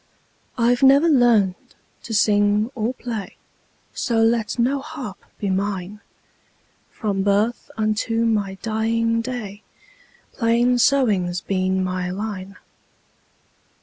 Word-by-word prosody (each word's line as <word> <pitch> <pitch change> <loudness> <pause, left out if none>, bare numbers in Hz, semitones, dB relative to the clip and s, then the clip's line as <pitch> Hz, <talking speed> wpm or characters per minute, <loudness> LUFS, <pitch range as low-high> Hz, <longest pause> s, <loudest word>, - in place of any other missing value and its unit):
I 235 0 +3
've 245 - -3
never 275 +4 +6
learned 235 - +2 0.3
to 230 - -5
sing 205 +2 +2
or 230 -2 -1
play, 230 -6 -6 0.6
So 235 -3 -1
let 225 -1 +1
no 255 +4 +1
harp 270 -8 -8
be 200 -2 -2
mine; 195 +1 -3 0.9
From 200 -3 -2
birth 205 +4 0
unto 220 +1 0
my 205 -4 0
dying 230 +1 0
day, 225 -5 -6 0.7
Plain 240 +1 +2
sewing 225 -10 +2
's 175 +1 -4
been 190 -1 0
my 185 -1 -2
line. 195 0 -5
220 Hz, 115 wpm, -22 LUFS, 200-235 Hz, 0.9 s, never